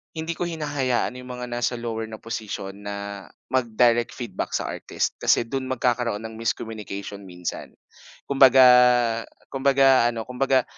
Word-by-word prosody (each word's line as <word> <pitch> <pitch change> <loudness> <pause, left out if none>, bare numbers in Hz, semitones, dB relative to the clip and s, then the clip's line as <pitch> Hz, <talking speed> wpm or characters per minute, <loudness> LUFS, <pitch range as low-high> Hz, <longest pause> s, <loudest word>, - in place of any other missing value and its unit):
hindi 160 +1 -3
ko 175 - -2
hinahayaan 145 -7 -1
'yung 125 0 -10
mga 125 0 -6
nasa 120 +1 -1
lower 115 -1 -3
na 110 - -8
posisyon 105 -3 -6
na 100 0 -6 0.3
mag-direct 120 -1 +2
feedback 115 -7 -5
sa - - -2
artist - - -3
kasi - - +3
do'n 130 +2 -4
magkakaroon 120 -4 0
ng 110 0 -7
miscommunication 105 -3 -4
minsan. 90 -1 -6 0.6
Kumbaga 135 -1 +7 0.9
kumbaga 135 -2 +4
ano 115 -1 -4
kumbaga, 130 0 +2
120 Hz, 135 wpm, -24 LUFS, 110-130 Hz, 0.9 s, Kumbaga